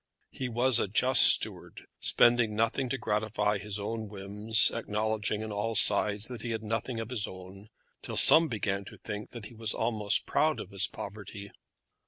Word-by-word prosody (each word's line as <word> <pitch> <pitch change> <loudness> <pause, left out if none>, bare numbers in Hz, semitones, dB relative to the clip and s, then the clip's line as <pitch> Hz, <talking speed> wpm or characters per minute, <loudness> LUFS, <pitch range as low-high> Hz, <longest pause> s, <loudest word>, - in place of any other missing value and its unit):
He 130 -2 -6
was 120 +1 +1
a - - -1
just 125 +6 +3
steward, - - +3
spending 120 -3 +2
nothing 115 +4 -1
to 135 - -2
gratify 105 -2 -2
his 105 0 -6
own 110 +1 -6
whims, 105 +2 +1
acknowledging 110 -1 -3
on 110 - -7
all 105 +2 -3
sides 105 0 +4
that 125 -3 -8
he 120 - -6
had 110 -1 -4
nothing 115 +2 -4
of 115 +1 -7
his 110 -5 -1
own, 95 +2 -12 0.3
till - - -6
some 165 +1 +7
began 100 -5 -3
to - - -13
think 105 0 -8
that 120 -4 -10
he 120 - -12
was 110 -1 -3
almost 110 -3 0
proud 155 0 0
of 95 - -9
his 100 +1 +2
poverty. 100 0 -10
110 Hz, 180 wpm, -28 LUFS, 105-115 Hz, 0.3 s, some